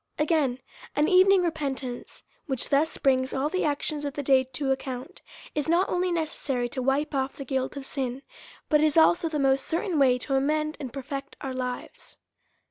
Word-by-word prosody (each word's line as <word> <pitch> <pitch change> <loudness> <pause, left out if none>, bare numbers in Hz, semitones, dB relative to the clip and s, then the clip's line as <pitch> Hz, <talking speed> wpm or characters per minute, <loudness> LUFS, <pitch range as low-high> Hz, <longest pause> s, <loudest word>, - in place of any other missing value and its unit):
Again: 300 -5 +1 0.4
An 295 +1 +3
evening 375 0 +6
repentance, 275 -7 -4 0.2
which 265 -4 -2
thus 295 +3 +2
brings 260 -1 +1
all 275 +3 0
the 370 +3 -1
actions 295 0 -1
of 285 -1 -4
the 285 - -3
day 265 -1 +4
to 270 +2 -2
account, 260 -1 -4 0.3
is 295 +1 -2
not 350 +3 +3
only 360 +1 +1
neces 330 -3 0
sary 250 -4 -1
to 260 - -4
wipe 275 +4 0
off 270 0 -1
tlie 275 - -6
guilt 265 +1 -2
of 275 - -6
c 270 - -4
in, 255 +1 -4 0.5
but 300 -1 +4
is 310 0 +2
also 335 +1 +5
the 310 - -2
most 270 -1 +2
certain 335 -1 0
way 255 -2 +5
to 270 +2 -4
amend 305 +3 +1
and 260 -4 -5
perfect 275 +1 -6
our 265 -1 -4
lives. 250 -1 -6
280 Hz, 195 wpm, -27 LUFS, 265-310 Hz, 0.5 s, evening